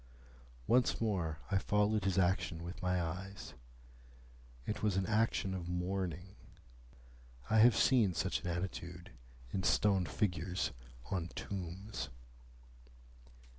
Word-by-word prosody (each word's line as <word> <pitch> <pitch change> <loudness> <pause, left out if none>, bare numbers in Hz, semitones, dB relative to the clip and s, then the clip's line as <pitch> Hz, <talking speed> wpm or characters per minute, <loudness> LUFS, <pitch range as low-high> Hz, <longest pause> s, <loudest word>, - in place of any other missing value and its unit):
Once 125 0 +3
more 90 -8 0
I 100 - +4
followed 105 0 +2
his 95 -1 +1
action 90 -2 +1
with 90 +2 -7
my 90 0 +1
eyes. 90 +3 -5 1.1
It 105 - -3
was 105 -3 +1
an 95 - +1
action 110 -2 +1
of 90 -2 -4
mourning. 90 +1 -2 1.2
I 110 - +5
have 115 -2 +7
seen 105 -3 +4
such 95 +3 0
an - - -5
attitude 85 0 -4 0.4
in 95 - -1
stone 95 -1 +3
figures 90 +1 -1 0.4
on 90 -3 -1
tombs. 95 - -5
95 Hz, 115 wpm, -35 LUFS, 90-105 Hz, 1.2 s, have